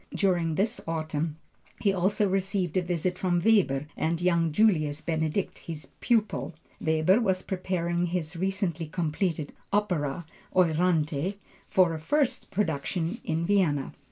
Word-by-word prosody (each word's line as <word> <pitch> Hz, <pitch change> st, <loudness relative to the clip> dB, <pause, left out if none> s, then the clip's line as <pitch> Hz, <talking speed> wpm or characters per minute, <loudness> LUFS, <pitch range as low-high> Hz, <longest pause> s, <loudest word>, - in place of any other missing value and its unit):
During 175 Hz, -5 st, +1 dB
this 205 Hz, +5 st, 0 dB
autumn 160 Hz, -1 st, -2 dB, 0.4 s
he 200 Hz, -3 st, +2 dB
also 195 Hz, +3 st, +2 dB
received 190 Hz, -2 st, -1 dB
a 185 Hz, -, +3 dB
visit 180 Hz, +1 st, -1 dB
from 175 Hz, -2 st, +1 dB
Weber 160 Hz, -11 st, +3 dB
and 165 Hz, +1 st, 0 dB
young 170 Hz, -2 st, +2 dB
Julius 155 Hz, -6 st, +3 dB
Benedict, 160 Hz, +3 st, -1 dB
his 150 Hz, -5 st, -7 dB
pupil. 220 Hz, -7 st, 0 dB, 0.2 s
Weber 160 Hz, +7 st, +3 dB
was 190 Hz, -4 st, +1 dB
preparing 175 Hz, -2 st, -1 dB
his 170 Hz, -1 st, -3 dB
recently 180 Hz, -3 st, -1 dB
completed 160 Hz, -1 st, -2 dB, 0.2 s
opera 170 Hz, -7 st, 0 dB, 0.3 s
Euryanthe, 165 Hz, -1 st, +2 dB, 0.3 s
for 180 Hz, -3 st, +4 dB
a 160 Hz, -, -4 dB
first 265 Hz, -, 0 dB
production 175 Hz, -, -1 dB
in 165 Hz, +1 st, -1 dB
Vienna. 170 Hz, -9 st, +1 dB
175 Hz, 130 wpm, -28 LUFS, 160-195 Hz, 0.4 s, for